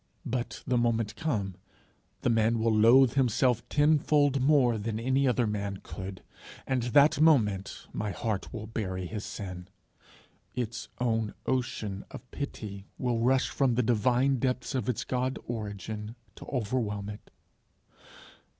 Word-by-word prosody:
but, 125 0 -3
the 125 -1 +2
moment 115 -2 0
come, 110 -12 -2 0.7
the - - +1
man 115 0 +3
will 110 0 +2
loathe 120 +4 +6
himself 125 -2 +2
tenfold 145 -2 +3
more 130 -5 +4
than 110 +1 -3
any 130 +3 +2
other 125 -1 +2
man 100 -2 -2
could, 95 -1 -7 0.4
and 130 -2 0
that 140 +5 +4
moment 105 -12 +3
my 105 - -2
heart 100 0 -3
will 115 -3 -6
bury 95 -5 -3
his 105 +4 -5
sin. 95 -3 -7 0.9
Its 120 -2 -3
own 115 -3 0
ocean 110 -6 -2
of 125 - -11
pity 105 -8 -6
will 120 -2 0
rush 130 +3 +3
from 130 -4 +1
the 125 - +2
divine 125 +4 +2
depths 130 +2 -1
of 130 -3 -1
its 125 - -1
God 130 +1 -1
origin 105 -1 -5 0.2
to - - -12
overwhelm 110 -5 -2
it. 105 0 -9
115 Hz, 140 wpm, -29 LUFS, 105-130 Hz, 0.9 s, loathe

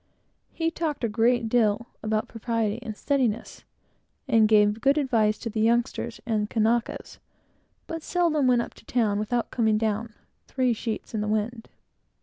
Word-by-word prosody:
He 330 -1 -1
talked 315 -5 -3
a - - +3
great 230 +2 +2
deal 225 -1 +2 0.2
about 215 0 -1
propriety 225 -1 -2
and 220 -4 -6
steadiness, 245 -6 -1 0.6
and 225 -4 +5
gave 210 0 +4
good 275 +3 +3
advice 225 -7 +2
to - - -7
the 215 - -3
youngsters 235 +1 0
and 215 -3 -1
Kanakas, 225 +1 -1 0.7
but 330 0 -5
seldom 315 -5 +1
went 245 -1 +4
up - - -10
to - - -18
the - - -14
town, 215 -4 +1
without 235 +3 -1
coming 220 -3 +2
down 220 0 -2 0.3
"three 255 -2 +1
sheets 225 0 -5
in 215 - -1
the 210 - -2
wind." 220 +2 -2
230 Hz, 160 wpm, -26 LUFS, 215-245 Hz, 0.7 s, and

